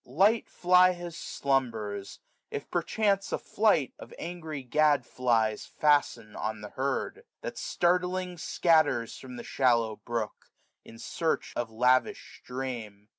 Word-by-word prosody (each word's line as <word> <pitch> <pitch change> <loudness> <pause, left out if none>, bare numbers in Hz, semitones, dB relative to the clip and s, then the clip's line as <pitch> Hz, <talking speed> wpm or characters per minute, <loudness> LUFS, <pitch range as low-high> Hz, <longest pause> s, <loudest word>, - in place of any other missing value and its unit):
Light 200 - +2
fly 180 +1 +5
his 175 -2 -7
slumbers, 115 -11 -2 0.3
if - - -6
perchance 200 -3 +1
a - - +1
flight 205 - +1
Of - - -11
angry 160 -4 -6
gad 145 0 +3
flies 115 -4 0
fasten 145 -7 +1
on 110 0 -3
the 105 - -7
herd; 140 - -2 0.2
That - - -6
startling 180 0 0
scatters 155 -10 +2
from 130 -2 -9
the 120 - -7
shallow 115 -4 +2
brook, 115 -3 -4 0.4
500 - - -12
In 115 - -13
search 160 +7 -2
of 120 -2 -2
lavish 125 +3 +1
stream. 115 -5 -6
135 Hz, 130 wpm, -29 LUFS, 115-175 Hz, 0.4 s, fly